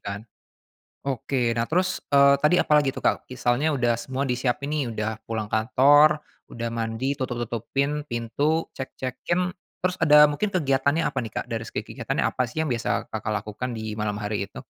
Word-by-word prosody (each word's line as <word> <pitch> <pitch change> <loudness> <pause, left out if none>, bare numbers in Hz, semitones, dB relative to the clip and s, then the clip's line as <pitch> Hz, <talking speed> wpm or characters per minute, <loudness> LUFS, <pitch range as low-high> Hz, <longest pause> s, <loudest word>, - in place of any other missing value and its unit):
kan? 100 0 -5 0.9
Oke, 130 -2 0
nah 115 0 0
terus, 185 +3 +1 0.2
eee, 140 0 +7
tadi 150 +4 +5
apalagi 150 -2 +3
tuh - - -7
Kak, - - +1
misalnya 125 +3 0
udah 120 -2 +2
semua 135 +2 -3
disiapin 125 +2 -1
nih, 155 -1 +1
udah 110 -1 -3
pulang 110 -2 -3
kantor, 145 +7 +5 0.3
udah 115 0 -4
mandi, 115 +2 -2
tutup-tutupin 120 +2 -2 0.2
pintu, 140 +8 0
cek-cekin, 175 +7 -3 0.3
terus 185 0 0
ada 150 -2 +6
mungkin 180 +9 -1
kegiatannya 140 -1 +2
apa - - -2
nih 110 -2 -7
Kak, - - -3
dari 115 0 -2
segi - - -3
kegiatannya, - - -2
apa 130 - -1
sih 125 - -14
yang 155 - -3
biasa 115 - -2
Kakak 110 0 -2
lakukan 110 +4 -5
di 110 - -5 0.2
malam 105 -1 -1
hari 105 -1 -2
itu? - - -10
130 Hz, 170 wpm, -25 LUFS, 115-145 Hz, 0.9 s, eee